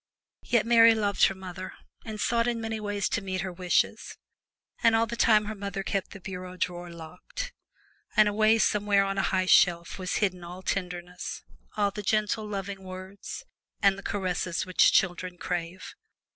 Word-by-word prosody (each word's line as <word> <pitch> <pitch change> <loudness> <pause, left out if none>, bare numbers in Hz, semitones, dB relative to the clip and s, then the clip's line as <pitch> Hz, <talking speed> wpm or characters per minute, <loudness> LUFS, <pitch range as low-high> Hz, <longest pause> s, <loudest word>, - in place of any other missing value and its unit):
Yet 235 -3 +1
Mary 230 -1 +7
loved 205 -2 +3
her 195 - 0
mother, 185 0 -8 0.3
and 215 -1 -7
sought 235 +2 +1
in 240 -1 0
many 225 -1 -3
ways 205 -1 -1
to 225 - -1
meet 190 -1 -3
her 185 -1 -4
wishes, 180 0 0 0.6
and 230 -1 +5
all 225 0 +3
the 235 +1 -5
time 215 -2 +4
her 215 - -4
mother 200 -1 -5
kept 195 -1 -2
the 200 - -10
bureau 185 -1 -7
drawer 175 -1 -3
locked, 170 - -8 0.6
and 215 -1 +7
away 215 +2 +4
somewhere 205 -2 +3
on 195 0 -2
a - - +1
high 185 -1 +1
shelf 170 -1 +3
was 185 0 -2
hidden 185 -4 0
all 180 +2 -9
tenderness 180 -2 -4 0.3
all 200 -1 +2
the 210 +1 -6
gentle, 215 +1 0
loving 195 -1 -5
words 185 +1 -8 0.3
and 200 -1 +4
the 200 - -9
caresses 185 -4 -2
which 185 -1 +4
children 180 -1 +1
crave. 175 +1 -4
195 Hz, 170 wpm, -28 LUFS, 180-215 Hz, 0.6 s, Mary